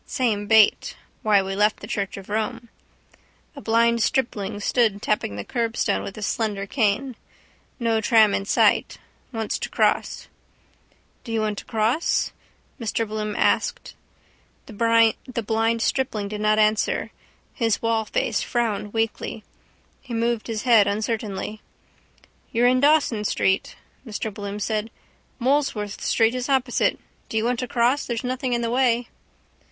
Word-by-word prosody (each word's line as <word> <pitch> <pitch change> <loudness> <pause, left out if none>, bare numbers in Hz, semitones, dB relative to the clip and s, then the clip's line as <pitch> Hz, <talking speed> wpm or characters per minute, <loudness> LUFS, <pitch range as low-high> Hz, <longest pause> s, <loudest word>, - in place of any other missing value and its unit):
Same 215 -5 -1
bait. 220 -1 +4 0.3
Why 205 -2 +3
we 195 0 -4
left 210 +2 +2
the - - -8
church 200 -1 -3
of 195 - -10
Rome. 225 +3 -3 0.9
A 280 - -9
blind 230 0 +2
stripling 215 -5 -1
stood 215 -1 +1
tapping 205 - -1
the 100 - -6
curbstone 230 -3 -1
with 195 - -7
his 215 - -4
slender 210 -4 -2
cane. 235 +3 0 0.6
No 230 -2 +1
tram 220 -2 +5
in 195 - -1
sight. - - +2 0.3
Wants 225 -3 -3
to - - -4
cross. - - 0 1.0
—Do 230 - -8
you 225 -1 0
want 210 -1 -2
to - - -12
cross? 225 +8 0 0.5
Mr 225 -1 -1
Bloom 215 0 -3
asked. - - 0 0.7
The 230 +1 +1
blind 225 +1 +1
stripling 220 -7 -1
did 210 0 -5
not 215 0 +3
answer. 215 0 +1 0.4
His 225 -4 +1
wallface 225 -2 0
frowned 215 -4 -2
weakly. 225 -1 -2 0.6
He 250 -4 -6
moved 230 0 -1
his 225 -2 -3
head 230 -5 +5
uncertainly. 215 0 -3 0.9
—You're 240 0 +2
in 255 +1 +4
Dawson 285 -6 +3
street, 190 -2 0 0.3
Mr 220 -3 -5
Bloom 200 0 -6
said. 215 +1 -2 0.5
Molesworth 250 -6 0
street 225 0 +2
is 255 +1 -3
opposite. 260 -2 +1 0.3
Do 220 - -2
you 220 - +1
want 245 0 0
to 250 - -3
cross? 245 +4 +1
There's 235 -1 -3
nothing 255 0 -2
in 240 - 0
the 230 -1 -1
way. 245 -1 +2
225 Hz, 145 wpm, -23 LUFS, 210-240 Hz, 1.0 s, tram